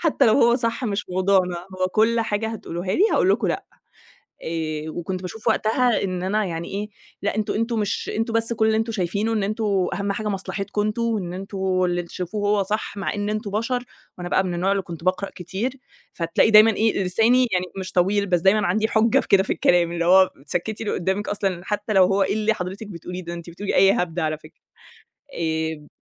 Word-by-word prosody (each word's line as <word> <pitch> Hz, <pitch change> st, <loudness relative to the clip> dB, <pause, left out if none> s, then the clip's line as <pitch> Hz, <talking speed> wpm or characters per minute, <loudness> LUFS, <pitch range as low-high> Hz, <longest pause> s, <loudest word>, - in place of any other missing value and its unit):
حتى 300 Hz, -5 st, +3 dB
لو 220 Hz, -, +5 dB
هو 235 Hz, -3 st, +5 dB
صح 235 Hz, +1 st, -2 dB
مش 205 Hz, -2 st, -2 dB
موضوعنا، 185 Hz, -1 st, +2 dB, 0.2 s
هو 185 Hz, -, +2 dB
كل 225 Hz, +4 st, +2 dB
حاجة 220 Hz, 0 st, -1 dB
هتقولوها 185 Hz, -4 st, -5 dB
لي، 385 Hz, -, +2 dB
هاقولكم 200 Hz, +3 st, +2 dB
لأ. -, -, -2 dB, 0.8 s
آآ، 155 Hz, -1 st, -3 dB
وكنت 180 Hz, +3 st, -4 dB
باشوف 200 Hz, +4 st, -4 dB
وقتها 240 Hz, +2 st, +2 dB
إن 185 Hz, -2 st, -3 dB
أنا 210 Hz, +3 st, 0 dB
يعني، 170 Hz, -2 st, -4 dB
إيه 205 Hz, +2 st, -4 dB, 0.3 s
لأ، 205 Hz, -, 0 dB
أنتم 215 Hz, -1 st, -1 dB
أنتم 230 Hz, +1 st, -1 dB
مش 210 Hz, -1 st, -2 dB
أنتم 225 Hz, +1 st, -1 dB
بس 230 Hz, +1 st, +1 dB
كل 220 Hz, -1 st, +1 dB
اللي 220 Hz, -, +2 dB
أنتم 225 Hz, +1 st, -1 dB
شايفينه، 200 Hz, +3 st, -1 dB
إن 215 Hz, -3 st, 0 dB
أنتم 215 Hz, +3 st, -2 dB, 0.3 s
أهم 200 Hz, 0 st, -1 dB
حاجة 210 Hz, +1 st, -3 dB
مصلحتكم 200 Hz, +1 st, -3 dB
أنتم، 215 Hz, +3 st, -1 dB
وإن 210 Hz, -7 st, -1 dB
أنتم 195 Hz, +2 st, -6 dB, 0.3 s
اللي 175 Hz, 0 st, 0 dB
تشوفوه 195 Hz, +4 st, -4 dB
هو 205 Hz, -1 st, +3 dB
صح، 210 Hz, +2 st, -3 dB
مع 195 Hz, -, -2 dB
إن 205 Hz, 0 st, -2 dB
أنتم 215 Hz, -1 st, -3 dB
بشر. 240 Hz, +4 st, -1 dB, 0.3 s
وأنا 175 Hz, 0 st, -5 dB
بقى 190 Hz, -, +2 dB
من 180 Hz, -2 st, -2 dB
النوع 180 Hz, +3 st, 0 dB
اللي 200 Hz, -1 st, 0 dB
كنت 170 Hz, -2 st, -9 dB
باقرأ 185 Hz, +1 st, 0 dB
كتير، 200 Hz, +9 st, -4 dB, 0.4 s
فتلاقي 170 Hz, +5 st, +2 dB
دايمًا 215 Hz, +1 st, +8 dB
إيه، 215 Hz, -2 st, +1 dB
لساني 230 Hz, +7 st, +3 dB
يعني 180 Hz, 0 st, +1 dB
مش 185 Hz, 0 st, -6 dB
طويل، 200 Hz, +3 st, +2 dB
بس 175 Hz, -3 st, +2 dB
دايمًا 200 Hz, +3 st, +3 dB
عندي 215 Hz, +5 st, +1 dB
حُجة 220 Hz, 0 st, +3 dB
في -, -, -10 dB
كده 195 Hz, -1 st, +5 dB
في 195 Hz, -, -2 dB
الكلام، 175 Hz, -1 st, +2 dB
اللي 170 Hz, 0 st, -1 dB
هو 185 Hz, +2 st, +6 dB, 0.2 s
تسكِّتي 215 Hz, +8 st, -3 dB
اللي -, -, -1 dB
قدَّامك 190 Hz, +3 st, -1 dB
أصلًا، 195 Hz, -3 st, -1 dB
حتى 210 Hz, +1 st, -2 dB
لو 190 Hz, -2 st, +6 dB
هو 195 Hz, +2 st, +2 dB
إيه 195 Hz, +1 st, +1 dB
اللي 220 Hz, 0 st, +1 dB
حضرتك 190 Hz, +3 st, -6 dB
بتقوليه 180 Hz, -1 st, -7 dB
ده؟ 170 Hz, +1 st, -5 dB
أنت 170 Hz, 0 st, -8 dB
بتقولي 195 Hz, +4 st, -4 dB
أي 195 Hz, 0 st, +6 dB
هبد، 180 Hz, -5 st, -2 dB
على 155 Hz, -2 st, -1 dB
فكرة. 155 Hz, 0 st, -18 dB, 0.7 s
آآ 160 Hz, -2 st, -3 dB
200 Hz, 210 wpm, -23 LUFS, 180-215 Hz, 0.8 s, دايمًا